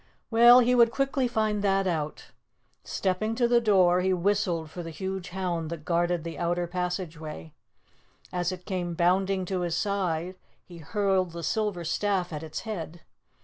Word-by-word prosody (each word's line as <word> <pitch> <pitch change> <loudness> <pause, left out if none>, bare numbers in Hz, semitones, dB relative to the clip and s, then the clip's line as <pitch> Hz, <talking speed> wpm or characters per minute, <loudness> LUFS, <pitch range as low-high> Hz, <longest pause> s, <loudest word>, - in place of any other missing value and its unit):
Well, 240 +2 +8
he 250 +1 +3
would 235 -2 +6
quickly 270 +1 0
find 215 -3 0
that 195 -1 +2
out. 155 -4 -3 0.5
Stepping 200 +4 -1
to 240 0 +2
the 240 0 +4
door, 185 -5 +4
he 190 +1 +1
whistled 180 -4 0
for 175 - -6
the 165 - -6
huge 190 +3 -5
hound 175 -3 -3
that 165 -2 -7
guarded 175 0 0
the 165 -1 -6
outer 175 0 0
passageway. 170 - -5 0.8
As 180 0 0
it 180 -1 -8
came 180 -3 -3
bounding 185 +2 +1
to 185 0 -2
his 175 -2 -1
side 185 -3 -1 0.3
he 175 -2 -12
hurled 190 0 0
the 170 0 -6
silver 210 -4 -1
staff 185 0 -1
at 150 - -4
its 160 -1 -6
head. 175 -6 -6
180 Hz, 165 wpm, -27 LUFS, 170-205 Hz, 0.8 s, Well